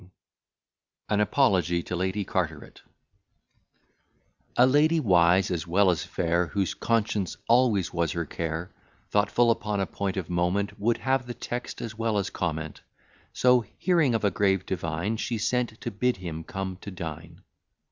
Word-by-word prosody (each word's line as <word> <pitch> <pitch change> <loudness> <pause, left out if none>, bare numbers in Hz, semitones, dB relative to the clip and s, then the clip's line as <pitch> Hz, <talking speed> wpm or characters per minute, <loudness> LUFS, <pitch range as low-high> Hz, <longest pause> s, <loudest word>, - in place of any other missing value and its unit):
_ 90 - -17 1.0
AN 105 -1 +2
APOLOGY 95 -8 +2
TO 90 - -4
LADY 95 +3 -1
CARTERET 80 -6 -3 1.8
A 125 - +7
lady, 150 +5 +4
wise 90 - +4
as 85 -3 -2
well 95 +2 +4
as 85 - -2
fair, 85 +1 0
Whose 100 0 -1
conscience 110 -4 -1
always 115 -6 +3
was 85 -3 0
her 85 -1 -2
care, 80 +4 -4 0.4
Thoughtful 105 +3 +3
upon 105 -3 -1
a 95 - +1
point 95 0 -3
of 90 -4 -3
moment, 95 +4 -1
Would 115 +3 +1
have 130 -1 0
the 120 - -5
text 120 0 -5
as 115 -1 -5
well 115 -1 0
as 100 0 -1
comment: 80 -3 -3 0.5
So 125 -1 +4
hearing 165 -9 +2
of 110 - -1
a 100 - +3
grave 95 -2 +1
divine, 85 +4 -2
She 115 +1 -2
sent 120 +1 -1
to 120 - -4
bid 125 +3 0
him 80 -3 -6
come 95 -1 -5
to - - -7
dine. 85 -1 -8
100 Hz, 155 wpm, -27 LUFS, 85-115 Hz, 1.8 s, A